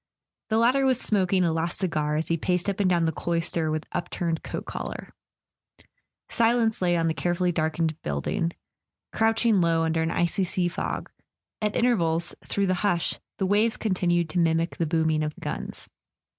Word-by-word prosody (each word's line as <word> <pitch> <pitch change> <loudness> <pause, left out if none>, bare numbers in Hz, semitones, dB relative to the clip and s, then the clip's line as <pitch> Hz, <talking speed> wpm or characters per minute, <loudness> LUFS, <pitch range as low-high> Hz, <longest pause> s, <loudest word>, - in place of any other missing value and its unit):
The 220 - +2
latter 250 +4 +3
was 260 -2 +3
smoking 190 -4 +2
a 165 - +1
last 165 +1 -1
cigar 155 -5 0
as 155 +1 -1
he 165 - +2
paced 180 +2 -1
up 200 -1 -1
and 195 -2 +3
down 170 -2 +2
the 160 - +1
cloister 165 0 -1
with 155 0 -2
upturned 175 -1 -2
coat - - -6
collar. - - -6 1.1
Silence 230 -2 +2
lay 175 -1 +2
on 165 0 +1
the 160 - +1
carefully 175 +2 0
darkened 160 -1 -1
building, 75 - -1 0.6
crouching 225 -2 +3
low 165 -1 +2
under 160 0 +1
an 160 - 0
icy 175 +4 +1
sea 180 -1 0
fog; - - -4 0.5
at 210 -1 0
intervals, 170 -9 +1
through 200 - 0
the 185 - +2
hush, 175 -5 0 0.2
the 190 - 0
waves 210 +4 +2
continued 175 -4 +1
to 180 - 0
mimic 165 0 +1
the 165 - 0
booming 160 -1 +1
of 150 0 -2
the - - -16
guns. - - -5
175 Hz, 175 wpm, -26 LUFS, 165-200 Hz, 1.1 s, latter